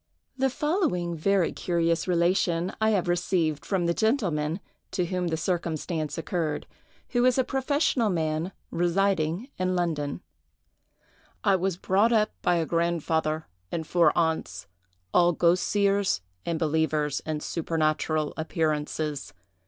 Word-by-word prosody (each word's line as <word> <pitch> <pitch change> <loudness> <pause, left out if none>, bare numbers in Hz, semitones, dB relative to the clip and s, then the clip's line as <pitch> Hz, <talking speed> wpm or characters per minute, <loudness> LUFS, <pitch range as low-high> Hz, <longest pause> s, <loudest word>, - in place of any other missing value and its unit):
The 265 0 +1
following 255 - 0
very 190 +2 +2
curious 170 -1 0
relation 175 0 +1
I 220 - +4
have 195 -5 +1
received 175 -4 0
from 190 -3 0
the 170 - +2
gentleman 180 - 0 0.3
to 180 - +1
whom 180 0 -1
the 160 -1 -1
circumstance 165 -2 -2
occurred, 165 -2 -2 0.4
who 245 -1 +1
is 255 0 +4
a 260 - +4
professional 265 -3 +1
man 160 0 -1 0.2
residing 175 - +1
in 185 0 +1
London:— 160 -3 -1 1.2
"I 200 -2 +4
was 185 -1 -1
brought 200 +5 +2
up 215 -2 +3
by 175 - +2
a 165 -1 +1
grandfather 160 -2 0 0.3
and 160 -1 -2
four 170 -2 +4
aunts, 160 - 0 0.5
all 175 0 +5
ghost 170 +2 +2
seers 200 - +2 0.3
and 170 -1 0
believers 155 -2 0
in 155 -1 -2
supernatural 155 -2 0
appearances. 155 - -2
170 Hz, 130 wpm, -27 LUFS, 160-190 Hz, 1.2 s, all